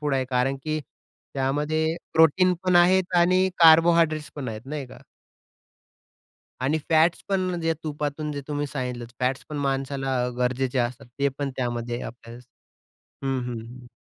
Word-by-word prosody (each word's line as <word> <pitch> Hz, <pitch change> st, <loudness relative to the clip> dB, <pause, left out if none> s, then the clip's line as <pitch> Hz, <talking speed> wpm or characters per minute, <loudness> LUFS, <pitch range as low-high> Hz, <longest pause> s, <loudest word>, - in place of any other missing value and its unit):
Food 145 Hz, -2 st, 0 dB
आहे 130 Hz, -1 st, +1 dB
कारण 130 Hz, +2 st, +1 dB
की 155 Hz, 0 st, -1 dB, 0.6 s
त्यामध्ये 150 Hz, +4 st, 0 dB, 0.2 s
प्रोटीन 180 Hz, +3 st, +5 dB
पण 180 Hz, -1 st, +4 dB
आहेत 180 Hz, +1 st, +4 dB
आणि 185 Hz, +2 st, +4 dB
कार्बोहायड्रेट्स 165 Hz, -1 st, +5 dB
पण 135 Hz, -3 st, -4 dB
आहेत 110 Hz, +2 st, -7 dB
नाही 145 Hz, -1 st, -5 dB
का. -, -, -13 dB, 1.6 s
आणि 140 Hz, +5 st, +1 dB
फॅट्स 160 Hz, +2 st, +3 dB
पण 185 Hz, -3 st, 0 dB
जे 165 Hz, 0 st, +1 dB
तुपातून 150 Hz, 0 st, -3 dB
जे 140 Hz, -, -4 dB
तुम्ही 145 Hz, 0 st, -2 dB
सांगितल, 125 Hz, -4 st, -4 dB, 0.2 s
फॅट्स 130 Hz, +1 st, 0 dB
पण 150 Hz, -, -5 dB
माणसाला 135 Hz, 0 st, -1 dB, 0.2 s
गरजेचे 130 Hz, +1 st, 0 dB
असतात. 125 Hz, +2 st, -2 dB
ते 140 Hz, -, +3 dB
पण 140 Hz, -1 st, -2 dB
त्यामध्ये 120 Hz, -1 st, -3 dB
आपल्याला 115 Hz, +1 st, -9 dB, 0.9 s
हं, 135 Hz, -1 st, 0 dB
हं. 120 Hz, +1 st, -8 dB
145 Hz, 140 wpm, -25 LUFS, 130-160 Hz, 1.6 s, प्रोटीन